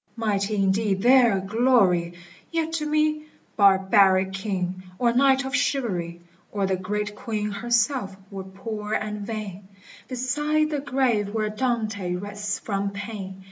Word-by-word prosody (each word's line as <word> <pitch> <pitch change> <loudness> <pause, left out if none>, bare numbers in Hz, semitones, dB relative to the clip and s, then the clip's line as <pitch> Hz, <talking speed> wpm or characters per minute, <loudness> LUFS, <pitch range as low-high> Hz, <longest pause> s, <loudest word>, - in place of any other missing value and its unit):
Mighty 210 -2 -1
indeed 195 0 +1
their 240 -5 +5
glory! 195 -5 +2 0.4
yet 325 -1 -1
to 305 -2 -1
me 305 0 +1 0.3
Barbaric 190 -1 +4
king, 185 -2 -3 0.2
or 235 -1 +2
knight 270 +1 +4
of 265 +1 -2
chivalry, 190 -12 -1 0.3
Or 200 -2 0
the 190 0 +1
great 210 +3 -3
queen 210 -1 -3
herself, 235 -1 0 0.2
were 195 -1 -6
poor 210 +3 -6
and 210 -1 -2
vain, 205 -4 -6 0.4
Beside 295 +5 0
the 295 - -1
grave 260 -7 0
where 215 -1 0
Dante 215 -6 -1
rests 205 +2 -4
from 200 -1 -2
pain. 200 -1 -7
210 Hz, 135 wpm, -25 LUFS, 195-250 Hz, 0.4 s, their